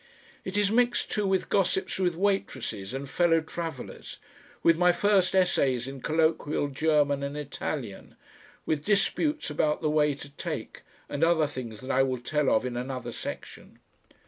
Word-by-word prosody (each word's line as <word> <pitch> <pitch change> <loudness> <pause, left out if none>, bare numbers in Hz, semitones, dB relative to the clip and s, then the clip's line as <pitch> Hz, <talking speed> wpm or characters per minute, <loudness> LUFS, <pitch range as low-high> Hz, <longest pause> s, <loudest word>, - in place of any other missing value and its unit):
It 190 +2 -4
is 205 -1 +3
mixed, 245 +1 +2
too, 210 -2 0
with 190 -1 +1
gossips 190 -1 0
with 180 -3 +1
waitresses 130 - -1
and 135 +2 -5
fellow 165 +3 +3
travellers, 160 -3 -7 0.5
with 165 - +6
my 180 +1 +4
first 195 0 +2
essays 135 -9 +2
in 135 -1 -7
colloquial 155 -1 +1
German 145 -1 +2
and 140 +1 -4
Italian, 140 -6 -5 0.5
with 150 -2 -1
disputes 255 - +1
about 150 +1 0
the 155 - +2
way 150 -2 +3
to 140 0 -10
take, 140 - -6 0.3
and 145 - -2
other 165 -2 +4
things 125 -6 -7
that 130 +1 -4
I 135 - +3
will 130 -1 +1
tell 145 +3 0
of 110 - +2
in 125 -1 -3
another 130 0 -4
section. - - -8
150 Hz, 160 wpm, -28 LUFS, 135-180 Hz, 0.5 s, with